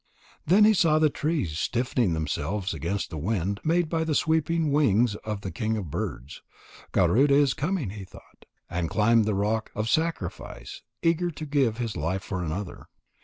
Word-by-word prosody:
Then 190 +6 +6
he 215 +1 +6
saw 165 -5 +3
the 155 -1 +3
trees 140 - -2
stiffening 120 -5 0
themselves 90 +5 -2
against 85 +6 -3
the 80 - -5
wind 100 +2 -1
made 170 +1 +2
by 160 0 -1
the 160 -2 -1
sweeping 160 0 +1
wings 120 -6 +3
of 105 -2 -5
the 95 - -5
king 110 -2 -2
of 90 -8 -5
birds. 65 +1 -5 0.5
"Garuda 140 +4 +4
is 140 -2 +4
coming," 150 - -2
he 100 -1 -8
thought, 95 - -17 0.2
and 85 -2 -2
climbed 115 +1 +3
the 105 -1 0
rock 105 +2 -1
of 105 +1 -2
sacrifice, 160 - -3 0.2
eager 170 +1 +2
to 155 -1 -7
give 135 -6 +1
his 115 -3 -3
life 90 +5 -2
for 95 -2 -4
another. 90 +3 -5
115 Hz, 170 wpm, -26 LUFS, 95-155 Hz, 0.5 s, Then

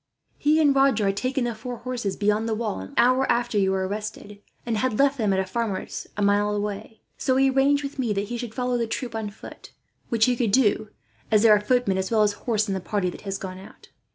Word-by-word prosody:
He 305 +2 +3
and 290 -3 +4
Roger 270 -6 +3
had 195 0 +1
taken 260 +3 -1
the 240 -1 -1
four 240 +3 -7
horses 240 -4 -3
beyond 210 +2 +1
the 220 - 0
walls, 215 - -3
an 95 - -14
hour 255 +2 +4
after 240 -3 0
you 190 -1 +2
were 190 0 0
arrested; 210 0 -6 0.2
and 230 -2 -1
had 235 -2 0
left 280 -1 +2
them 210 -3 +1
at 190 - +1
a 190 - 0
farmer's, 210 0 -4
a 205 - 0
mile 205 +1 +2
away. 210 +1 -5 0.2
So 260 - +1
he 270 0 +4
arranged 280 +2 +3
with 280 0 -6
me 240 -4 0
that 200 0 -3
he 240 - -3
should 235 -2 -6
follow 250 -1 -1
the 230 - -1
troop 235 +1 -4
on 220 -2 -3
foot; 205 - -13 0.4
which 225 -2 +3
he 250 - +2
could 230 -4 0
do, 215 -3 +3 0.4
as 215 0 +4
there 220 -2 +7
are 205 - 0
footmen 210 -4 +1
as 190 - -2
well 220 -2 +3
as 205 -1 +2
horse 215 0 -1
in 195 - -1
the 190 - -2
party 185 0 -2
that - - -11
has 195 -1 -4
gone 185 -1 -7
out. 190 - -15
220 Hz, 250 wpm, -24 LUFS, 205-250 Hz, 0.4 s, there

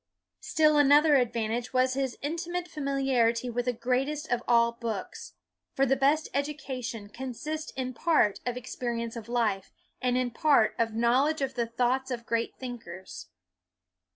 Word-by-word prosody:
Still 305 -2 +3
another 290 +2 +6
advantage 235 0 -1
was 255 0 +3
his 265 -2 -2
intimate 345 +4 -3
familiarity 270 -6 0
with 245 +1 -2
the 250 - +2
greatest 265 +6 -1
of 245 -1 +1
all 235 -1 +4
books; 230 -4 -6 0.4
for 270 - +3
the 270 +1 +3
best 285 +4 +2
education 260 -6 -4
consists 265 +7 -5
in 255 -1 -3
part 235 -7 +2
of 245 0 -3
experience 235 -2 -4
of 230 -1 -8
life, 220 -5 0 0.3
and 250 0 +1
in 250 -1 0
part 275 -4 +3
of 225 -1 0
knowl 240 +5 +3
edge 315 -1 -2
of 265 0 -2
the 235 -2 -1
thoughts 250 +3 0
of 240 -2 -4
great 230 0 -1
thinkers. 225 -8 -8
250 Hz, 155 wpm, -28 LUFS, 235-275 Hz, 0.4 s, another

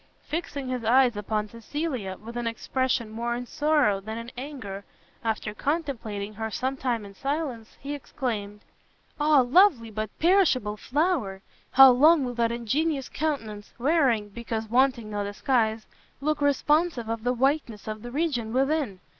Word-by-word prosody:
Fixing 290 -5 -4
his 250 -2 -3
eyes 245 +1 +4
upon 210 +1 -2
Cecilia, 230 - -4
with 230 +3 -10
an 240 -1 -2
expression 235 0 -1
more 235 +2 -2
in 245 +1 -5
sorrow 290 -8 +2
than 220 +3 -6
in 230 +1 -7
anger, 245 -8 -7 0.4
after 220 -1 -2
contemplating 230 -8 -3
her 220 +1 -4
some 260 +5 -2
time 245 -5 -2
in 200 - -11
silence, 270 -2 -4
he 280 +2 -5
exclaimed, 210 -7 -4 0.6
"Ah 295 -2 +5
lovely, 255 - +4
but 215 0 -3
perishable 315 - +3
flower! 255 - -1 0.3
how 270 0 +10
long 295 +3 +5
will 245 - -3
that 235 -1 +1
ingenuous 270 +5 -1
countenance, 225 -10 -3
wearing, 250 -6 +2
because 225 +1 -4
wanting 240 -2 +2
no 205 -1 -2
disguise, 220 +1 0 0.3
look 300 +2 -1
responsive 290 -2 +2
of 225 -1 -3
the 245 - +2
whiteness 255 -4 0
of 215 0 -5
the 240 - -7
region 250 -6 -1
within? 270 -6 0
245 Hz, 150 wpm, -26 LUFS, 220-285 Hz, 0.6 s, how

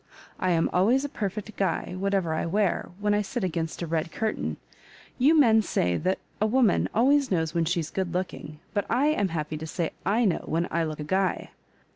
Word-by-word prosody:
I 185 - 0
am 165 -2 +3
always 235 +10 +3
a - - -4
perfect 210 -1 -4
guy, 190 -2 -1
whatever 190 -3 0
I 160 - -1
wear, 200 +2 0
when 210 0 +1
I 205 - +2
sit 240 +3 -4
against 165 -1 -2
a - - -1
red 165 0 -2
curtain. 220 +4 -2 0.6
You 300 +5 +5
men 225 -5 +6
say 90 - 0
that 185 - 0 0.2
a 215 - +4
woman 235 -3 +3
always 275 +4 +3
knows 160 -4 0
when 170 -1 +1
she's 165 -2 -1
good 190 -3 -2
looking, 180 -4 -4 0.2
but 205 - -1
I 265 +6 +3
am 205 -10 +1
happy 155 -3 -3
to 160 +1 -6
say 165 +1 -2
/know 205 -2 +1
when 170 +2 0
I 165 0 +1
look 155 -1 -5
a - - -3
guy. 190 +4 -1
190 Hz, 200 wpm, -26 LUFS, 165-220 Hz, 0.6 s, men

